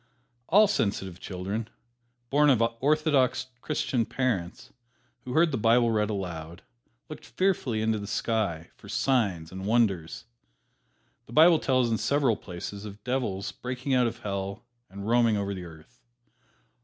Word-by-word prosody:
All 210 +5 +6
sensitive 100 - -1
children, 100 +5 -4 0.6
born 145 +1 +5
of 120 -4 +4 0.2
orthodox 145 -3 +2 0.2
Christian 130 -5 -1
parents, 120 -1 -3 0.5
who 125 - -5
heard 160 +2 +4
the 130 - -1
Bible 115 +1 +4
read 105 -1 +1
aloud, 85 -5 -5 0.4
looked - - -9
fearfully 140 - 0
into 110 -1 +1
the 100 - -6
sky 100 -8 -2
for - - -15
"signs 100 -12 0
and 95 +1 -6
wonders." 105 -8 +1 1.0
The 120 - -12
Bible 160 +2 +7
tells 130 -3 +1
in 110 - 0
several 140 -5 +2
places 100 +2 -8
of 105 0 -10
devils 120 -7 -2
breaking 125 +2 -4
out 125 -2 +4
of 115 0 -6
Hell 100 +1 -4 0.2
and 100 +1 -8
roaming 115 -2 +3
over 100 0 -2
the 90 -2 -7
earth. 80 +8 -15
110 Hz, 145 wpm, -27 LUFS, 100-130 Hz, 1.0 s, Bible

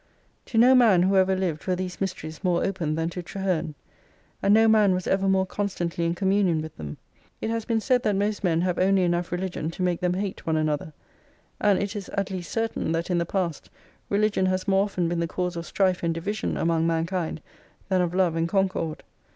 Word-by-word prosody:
To 230 - -3
no 245 +3 +7
man 220 -9 +5
who 195 +1 +2
ever 190 0 +4
Hved 175 -4 -2
were 185 - +2
these 185 +1 -5
mysteries 160 -4 -4
more 180 -2 +1
open 170 -6 -1
than 165 +1 -1
to 180 - -5
Traherne, 175 -4 -2 0.7
and 200 - +3
no 225 +1 +6
man 210 -4 +5
was 180 - -3
ever 195 0 +1
more 190 0 +3
con 205 +2 -2
stantly 170 -3 -2
m 170 - -1
communion 190 -3 +2
with 155 0 -6
them. 75 -2 -7 0.4
It 220 - -2
has 230 -1 -2
been 230 -1 +1
said 250 +2 +2
that 210 -3 +1
most 205 +1 -1
men 170 -3 +2
have 180 0 0
only 190 0 +3
enough 175 0 0
religion 175 -3 -3
to 175 +2 -4
make 180 -2 0
them 180 0 0
hate 195 -2 -4
one 160 -1 +2
another; 155 0 -1 0.7
and 205 -2 +3
it 200 +2 -3
is 200 -3 -6
at 200 0 -1
least 180 -2 -5
certain 225 -7 -1
that 165 +2 -2
in 175 - +2
the 170 - -1
past 175 -5 -2 0.4
religion 205 -2 +2
has 185 +1 -1
more 195 0 +3
often 180 -4 -1
been 170 0 -1
the 170 - 0
cause 180 +1 -3
of 170 0 -5
strife 185 -2 +1
and 165 -1 0
division 200 +5 -3
among 165 0 +1
mankind 165 0 -1 0.5
than 185 -1 +2
of 175 0 -1
love 180 -3 +2
and 165 0 0
concord. 185 -5 -1
185 Hz, 220 wpm, -25 LUFS, 170-195 Hz, 0.7 s, no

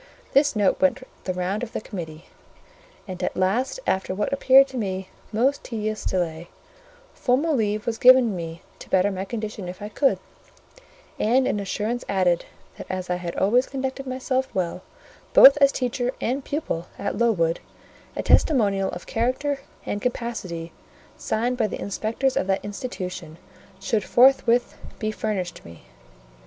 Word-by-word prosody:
This 280 -2 +4
note 205 +4 +2
went 265 -2 +2 0.2
the 185 - -1
round 185 +3 -2
of 240 -2 -6
the - - -2
committee, 165 -6 -8 0.8
and 185 -2 -6
at - - -2
last, 215 - 0
after 190 0 0
what 210 - -1
appeared 270 0 +6
to 265 - -7
me 190 -4 -3 0.2
most 255 +6 +1
tedious 215 -2 -3
delay, 170 -2 -2 0.6
formal 285 +5 +1
leave 210 -3 0
was 225 -1 -2
given 250 -4 +6
me 165 0 -6 0.2
to - - -12
better 190 +2 +3
my 190 0 -4
condition 210 -3 -5
if 185 - -8
I 205 - -6
could; 270 +5 +2 1.0
and 255 +4 +3
an 210 - 0
assurance 215 +4 -2
added, 180 -3 +2 0.3
that - - -9
as 185 -1 -3
I 180 - +1
had 175 -1 -5
always 240 +7 +3
conducted 270 0 -4
myself 260 0 -1
well, 180 -1 -2 0.5
both 275 +1 +10
as 280 -1 +5
teacher 250 -1 -1
and 265 +4 -1
pupil, 280 - -3
at 200 +1 -3
Lowood, 175 -8 +2 0.6
a - - -2
testimonial 200 -9 +3
of 175 - -7
character 260 +5 -1 0.3
and 205 - -3
capacity, 210 -9 -4 0.4
signed 245 +3 -1
by 225 -3 +2
the - - -6
inspectors 225 +6 -1
of - - 0
that 195 0 0
institution, 185 -7 -6 0.4
should 210 +1 0
forthwith 245 0 +4 0.2
be 215 -1 -2
furnished 200 -5 -3
me. 85 -1 -13
215 Hz, 155 wpm, -24 LUFS, 185-255 Hz, 1.0 s, both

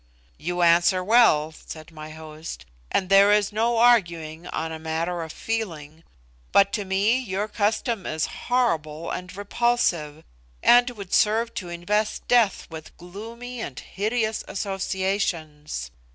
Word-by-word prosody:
"You 175 +2 -1
answer 175 +2 +4
well," 190 -8 +4
said 155 +1 -11
my 155 -1 -9
host, 155 0 -9 0.2
"and 190 - 0
there 195 +1 +6
is 210 0 +3
no 230 +2 +1
arguing 170 -9 +2
on 160 0 -3
a 160 - -6
matter 165 +2 -2
of 160 -1 -6
feeling; 165 -10 -5 0.5
but 200 0 +4
to 205 -3 -2
me 200 +6 +2
your 205 -4 -3
custom 215 0 -1
is 155 0 -1 0.2
horrible 165 -11 0
and 180 +1 -6
repulsive, 200 -8 0 0.4
and 245 +1 +6
would 200 -6 -9
serve 225 +2 +2
to 180 - -5
invest 205 +5 -2
death 235 -5 +3
with 160 -1 -10
gloomy 230 +7 -8
and 135 - -6
hideous 220 +2 -2
associations. 190 - -3
190 Hz, 135 wpm, -24 LUFS, 160-220 Hz, 0.5 s, there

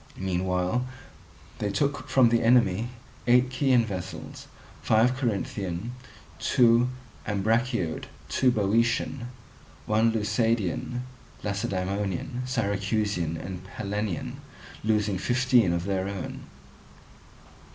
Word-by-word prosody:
Meanwhile 90 +4 0 0.8
they 105 - -1
took 140 +8 -1
from 130 -3 +5
the 115 0 +3
enemy 115 -2 +3 0.4
eight 125 +1 +5
Chian 130 -2 +3
vessels, 95 -3 -6 0.3
five 115 +3 +3
Corinthian, 105 -4 -2 0.5
two 120 -1 +4 0.4
Ambraciot, 105 -3 0 0.2
two 130 - +3
Boeotian, 115 +3 +1 0.6
one 110 +2 +3
Leucadian, 110 +1 0 0.4
Lacedaemonian, 100 +2 -2
Syracusan, 100 -7 0
and 90 +2 -6
Pellenian, 100 0 -4 0.5
losing 105 -3 +1
fifteen 125 -3 +3
of 85 0 -1
their 95 0 -1
own. 100 -3 -6
105 Hz, 90 wpm, -27 LUFS, 95-120 Hz, 0.8 s, from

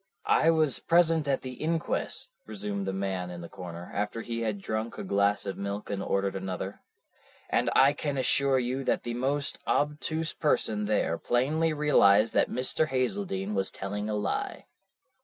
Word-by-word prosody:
"I 165 - +4
was 155 -4 +3
present 165 -3 +3
at 135 -1 +1
the 130 - -6
inquest," 160 +5 -2 0.2
resumed 100 -2 -3
the - - 0
man 95 -2 -2
in 90 -1 -7
the 85 - -7
corner, 90 -1 -8
after 105 +3 -2
he 115 -1 -3
had 110 -3 -1
drunk 110 +3 -3
a - - -4
glass 100 +1 +1
of 100 -1 -4
milk 100 +1 -4
and 100 -1 -2
ordered 100 0 0
another, 95 +1 -4 0.7
"and - - +2
I 135 +2 +6
can 145 -1 -3
assure 135 +1 +3
you 130 +2 -1
that - - +1
the 120 - -3
most 140 +4 -1
obtuse 155 +2 0
person 110 -8 +1
there 105 -6 0
plainly 155 +7 +1
realized 115 -9 +4
that - - +3
Mr. 130 +5 0
Hazeldene 130 - -1
was 95 -1 0
telling 105 +2 -4
a 105 - -1
lie. 105 -1 -2
110 Hz, 170 wpm, -28 LUFS, 100-145 Hz, 0.7 s, I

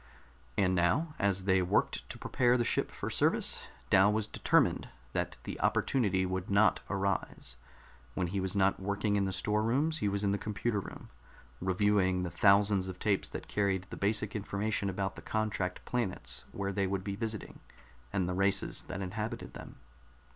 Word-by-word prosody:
And 95 -2 +3
now, 120 - +2
as 100 -1 +1
they 95 -1 +3
worked 90 - 0
to - - -5
prepare 125 -1 +2
the 120 - +1
ship - - 0
for - - -5
service, - - +1 0.2
Dal 95 +2 +6
was 110 0 +1
determined - - +2 0.2
that - - -2
the - - -6
opportunity 95 -8 +2
would 95 +1 -3
not 100 +2 +4
arise. 95 -9 -2 0.6
When 90 - 0
he 95 +3 -2
was 95 0 -1
not 95 0 +3
working 100 +2 0
in 100 -1 +2
the 95 - -1
storerooms, 115 +11 +1
he 105 - 0
was 100 +1 -1
in 100 - +2
the 100 - 0
computer 105 +1 -1
room, - - -9 0.5
reviewing 95 0 +2
the 90 - -3
thousands 100 +1 +4
of 95 -1 -6
tapes 100 -1 0
that - - -7
carried 95 -3 0
the - - -4
basic 105 +1 0
information 100 0 -1
about 95 0 -2
the - - -9
contract 105 -4 -2
planets 120 -7 -3
where 100 0 -3
they 100 0 +1
would 95 0 -2
be 100 -1 -3
visiting, 110 -1 -5 0.5
and 95 -3 0
the 90 - -1
races 95 +1 +1
that 95 +1 -5
inhabited 110 +5 -4
them. - - -10
100 Hz, 175 wpm, -32 LUFS, 95-105 Hz, 0.6 s, Dal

